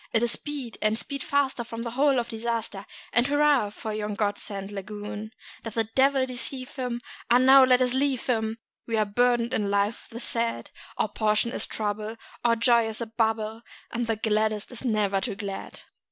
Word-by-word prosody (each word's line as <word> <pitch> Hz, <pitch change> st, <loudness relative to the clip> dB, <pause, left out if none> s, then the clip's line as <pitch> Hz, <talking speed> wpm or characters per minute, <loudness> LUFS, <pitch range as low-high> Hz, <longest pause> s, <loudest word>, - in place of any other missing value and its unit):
It 225 Hz, -, +3 dB
is 240 Hz, -, +2 dB
"Speed, 275 Hz, -4 st, -5 dB
and 215 Hz, +1 st, +2 dB
speed 275 Hz, +3 st, -5 dB
faster 275 Hz, -3 st, +1 dB
from 230 Hz, 0 st, -6 dB
this 235 Hz, -1 st, -4 dB
hole 275 Hz, +1 st, +3 dB
of 240 Hz, -1 st, 0 dB
disaster! 225 Hz, -3 st, -3 dB, 0.3 s
And 240 Hz, +2 st, +4 dB
hurrah 290 Hz, -6 st, +3 dB
for 215 Hz, +1 st, -6 dB
yon 210 Hz, -1 st, -3 dB
God 205 Hz, -1 st, 0 dB
sent 200 Hz, -1 st, -6 dB
lagoon!" 210 Hz, +1 st, -6 dB, 0.3 s
Doth 225 Hz, -1 st, -7 dB
a 225 Hz, -, +4 dB
devil 265 Hz, +4 st, +3 dB
deceive 255 Hz, 0 st, -5 dB
them? 250 Hz, -3 st, -3 dB, 0.3 s
Ah, 240 Hz, -, +7 dB
now 265 Hz, +1 st, +8 dB
let 255 Hz, 0 st, +5 dB
us 250 Hz, -1 st, +1 dB
leave 265 Hz, -1 st, +1 dB
them 220 Hz, -2 st, 0 dB, 0.3 s
We 225 Hz, -1 st, 0 dB
are 215 Hz, -, +3 dB
burdened 240 Hz, +3 st, +2 dB
in 205 Hz, -5 st, +1 dB
life 200 Hz, +2 st, 0 dB
with -, -, -14 dB
the -, -, -4 dB
sad; 230 Hz, -1 st, -1 dB, 0.3 s
Our -, -, +2 dB
portion 215 Hz, +1 st, +1 dB
is -, -, -1 dB
trouble, 215 Hz, +1 st, -3 dB, 0.3 s
our 235 Hz, -1 st, +4 dB
joy 235 Hz, 0 st, +4 dB
is 220 Hz, 0 st, -4 dB
a 235 Hz, -, -2 dB
bubble, 220 Hz, 0 st, -1 dB, 0.3 s
And 235 Hz, 0 st, -2 dB
the 225 Hz, -, +1 dB
gladdest 215 Hz, 0 st, 0 dB
is 245 Hz, -, -8 dB
never 210 Hz, -5 st, +1 dB
too 195 Hz, -, -3 dB
glad. 200 Hz, -1 st, -6 dB
230 Hz, 195 wpm, -27 LUFS, 215-250 Hz, 0.3 s, now